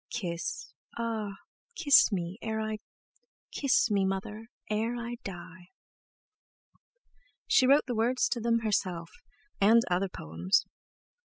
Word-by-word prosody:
Kiss, 185 Hz, -, -4 dB, 0.2 s
ah! 225 Hz, -3 st, -3 dB, 0.4 s
kiss 290 Hz, -, +5 dB
me 180 Hz, +1 st, -3 dB
e -, -, -7 dB
ere 220 Hz, 0 st, -1 dB
I— 215 Hz, 0 st, -3 dB, 0.7 s
Kiss 275 Hz, -3 st, +2 dB
me, 200 Hz, -1 st, +2 dB
Mother, 195 Hz, +3 st, -3 dB, 0.2 s
ere 220 Hz, +3 st, -1 dB
I 235 Hz, 0 st, -5 dB
d -, -, -4 dB
d -, -, -48 dB
die!" 175 Hz, 0 st, -11 dB, 1.8 s
She 255 Hz, -, +4 dB
wrote 280 Hz, +3 st, +5 dB
the 250 Hz, -, -3 dB
words 240 Hz, +3 st, +1 dB
to 240 Hz, -, -1 dB
them 230 Hz, 0 st, +1 dB
herself, 185 Hz, -6 st, -1 dB, 0.5 s
and 225 Hz, +4 st, +5 dB
other 185 Hz, +2 st, +1 dB
poems. 85 Hz, -, 0 dB
215 Hz, 135 wpm, -29 LUFS, 185-235 Hz, 1.8 s, kiss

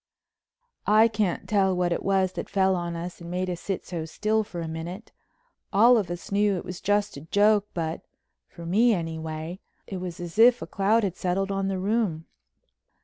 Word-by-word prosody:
I 215 Hz, +2 st, +6 dB
can't 210 Hz, -5 st, -1 dB
tell 195 Hz, -3 st, +2 dB
what 180 Hz, -1 st, +1 dB
it -, -, 0 dB
was 190 Hz, -1 st, +1 dB
that -, -, -6 dB
fell 190 Hz, -1 st, +2 dB
on 175 Hz, -1 st, -3 dB
us 170 Hz, +1 st, -6 dB
and 170 Hz, -, -8 dB
made 180 Hz, +1 st, -2 dB
us 175 Hz, -, -5 dB
sit 195 Hz, -2 st, -3 dB
so 170 Hz, -3 st, -4 dB
still 215 Hz, +6 st, 0 dB
for 180 Hz, -4 st, -8 dB
a 165 Hz, -, -4 dB
minute. 170 Hz, +6 st, -7 dB, 0.6 s
All 230 Hz, +5 st, +6 dB
of 210 Hz, -6 st, 0 dB
us 175 Hz, +2 st, -6 dB
knew 205 Hz, 0 st, +2 dB
it -, -, -6 dB
was 180 Hz, 0 st, -7 dB
just 205 Hz, -4 st, 0 dB
a -, -, -8 dB
joke, 205 Hz, +5 st, +3 dB
but—for 165 Hz, 0 st, -7 dB
me, 220 Hz, +6 st, +4 dB
anyway—it 160 Hz, +3 st, -6 dB
was 180 Hz, -2 st, -6 dB
as 175 Hz, +4 st, -6 dB
if 245 Hz, +2 st, +7 dB
a -, -, -5 dB
cloud 210 Hz, +4 st, +2 dB
had 190 Hz, -3 st, -1 dB
settled 195 Hz, +2 st, -1 dB
on 195 Hz, 0 st, -1 dB
the 195 Hz, -1 st, -1 dB
room. 190 Hz, -5 st, -1 dB
190 Hz, 190 wpm, -26 LUFS, 170-205 Hz, 0.6 s, if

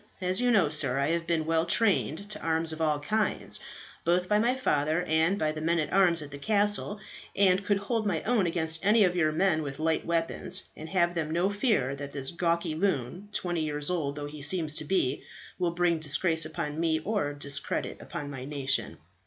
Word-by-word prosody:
"As 185 Hz, +3 st, +1 dB
you 250 Hz, -, +2 dB
know, 195 Hz, -10 st, +4 dB
sir, 145 Hz, -4 st, +2 dB
I 140 Hz, +1 st, +1 dB
have 170 Hz, 0 st, -1 dB
been 165 Hz, -2 st, 0 dB
well 165 Hz, +1 st, +1 dB
trained 200 Hz, -2 st, +1 dB
to -, -, -4 dB
arms 160 Hz, 0 st, 0 dB
of 160 Hz, -, -6 dB
all 150 Hz, -2 st, +1 dB
kinds, 215 Hz, +9 st, -1 dB, 0.4 s
both 180 Hz, +1 st, +1 dB
by 210 Hz, +1 st, +3 dB
my 240 Hz, +4 st, +2 dB
father 155 Hz, -, +1 dB
and 160 Hz, +3 st, +2 dB
by 155 Hz, -5 st, 0 dB
the 155 Hz, 0 st, -6 dB
men 170 Hz, +2 st, +1 dB
at 155 Hz, -2 st, -2 dB
arms 175 Hz, -4 st, +4 dB
at 145 Hz, -, -10 dB
the 140 Hz, -, -8 dB
castle, 205 Hz, +2 st, +1 dB, 0.4 s
and 190 Hz, -1 st, +3 dB
could 205 Hz, 0 st, +1 dB
hold 215 Hz, +2 st, -1 dB
my 170 Hz, -6 st, -1 dB
own 220 Hz, -6 st, +2 dB
against 165 Hz, -1 st, -1 dB
any 210 Hz, +2 st, +5 dB
of 180 Hz, -2 st, +2 dB
your 155 Hz, -3 st, +2 dB
men 160 Hz, 0 st, +2 dB
with 140 Hz, -2 st, -5 dB
light 160 Hz, 0 st, 0 dB
weapons, 165 Hz, -1 st, -1 dB
and 160 Hz, +1 st, -9 dB
have 175 Hz, -2 st, +2 dB
then 160 Hz, -3 st, -2 dB
no 175 Hz, +4 st, +1 dB
fear 205 Hz, -, +1 dB
that 140 Hz, 0 st, -7 dB
this 135 Hz, -2 st, -1 dB
gawky 170 Hz, -1 st, 0 dB
loon, 175 Hz, +1 st, -2 dB
twenty 175 Hz, -5 st, -2 dB
years 150 Hz, +1 st, -1 dB
old 145 Hz, -5 st, -1 dB
though 145 Hz, 0 st, -5 dB
he 145 Hz, 0 st, -8 dB
seems 155 Hz, +1 st, +1 dB
to 155 Hz, -, -3 dB
be, 145 Hz, -6 st, 0 dB, 0.4 s
will 175 Hz, -1 st, +1 dB
bring 175 Hz, -2 st, +2 dB
disgrace 160 Hz, +2 st, +1 dB
upon 155 Hz, -1 st, -4 dB
me 165 Hz, -1 st, +2 dB
or 200 Hz, -6 st, -1 dB
discredit 145 Hz, -1 st, -3 dB
upon 145 Hz, -1 st, -6 dB
my 130 Hz, -2 st, -7 dB
nation." 135 Hz, -, -1 dB
165 Hz, 210 wpm, -28 LUFS, 150-190 Hz, 0.4 s, any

